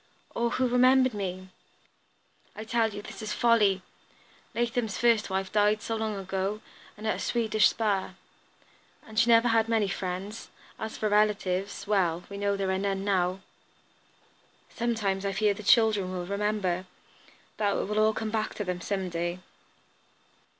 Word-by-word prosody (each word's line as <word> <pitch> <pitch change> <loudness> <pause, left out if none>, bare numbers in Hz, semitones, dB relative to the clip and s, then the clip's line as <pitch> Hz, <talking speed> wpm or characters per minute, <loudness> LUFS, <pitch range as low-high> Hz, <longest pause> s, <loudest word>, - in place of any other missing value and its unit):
"Or 235 0 0
who 255 +1 +1
remembered 255 +1 +4
me!" 185 -2 -5 1.1
"I 215 - -6
tell 225 0 +1
you 205 0 -7
this - - -9
is 215 -1 -3
folly! 210 -5 +3 0.7
Latham's 235 -2 -1
first 230 -3 +3
wife 190 0 -2
died 210 0 +2
so 225 - -2
long 220 -1 -2
ago, 195 +2 -2 0.4
and 215 - -9
at 215 - 0
a - - -8
Swedish 220 -2 +2
spa. 200 -4 -1 0.9
And 220 -1 -2
she 235 - +4
never 230 +1 +6
had 225 0 +2
many 220 -3 +2
friends. 195 +2 -5 0.3
As 220 0 -5
for 215 - 0
relatives, 205 -2 +1
well, 180 -5 +1
we 200 - -6
know 200 0 0
there 195 -1 -1
are 190 - 0
none 195 -1 -1
now." 185 -1 +1 1.3
"Sometimes 215 -5 -1
I 200 -1 -1
fear 210 +1 +2
the 200 - -9
children 210 -3 +3
will 180 -1 -4
remember; 200 -2 -1 0.7
that 205 -2 +1
it - - -1
will 210 +1 0
all 215 0 +4
come 220 -1 -3
back 220 -1 -2
to 210 - -3
them, 180 -2 -3
some 190 -1 -2
day." 175 0 -3
210 Hz, 160 wpm, -28 LUFS, 190-220 Hz, 1.3 s, never